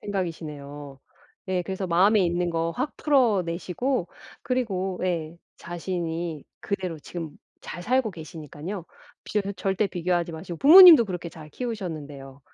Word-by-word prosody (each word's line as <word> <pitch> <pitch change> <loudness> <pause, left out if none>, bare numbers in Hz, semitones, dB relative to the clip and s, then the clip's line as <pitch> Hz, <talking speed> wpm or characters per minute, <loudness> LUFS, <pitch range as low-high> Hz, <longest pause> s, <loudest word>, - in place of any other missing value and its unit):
생각이시네요. 150 -7 -6 0.5
네 185 -1 -1
그래서 190 +1 -4
마음에 195 +5 +4
있는 175 0 0
거 165 0 -1
확 265 +4 -3
풀어내시고 210 - 0 0.3
그리고 195 -8 -2
예 170 -2 -2 0.2
자신이 170 -2 -4 0.2
그대로 185 -5 -3
지금 160 0 -8 0.2
잘 175 - -8
살고 250 0 +1
계시니까요. 160 +2 -8 0.4
비교 200 -1 -2
절대 195 +1 0
비교하지 175 -2 -1
마시고 165 +1 -7
부모님도 320 -3 +10
그렇게 180 -3 -5
잘 155 -2 -12
키우셨는데요. 150 - -6
175 Hz, 320 characters per minute, -25 LUFS, 165-200 Hz, 0.5 s, 부모님도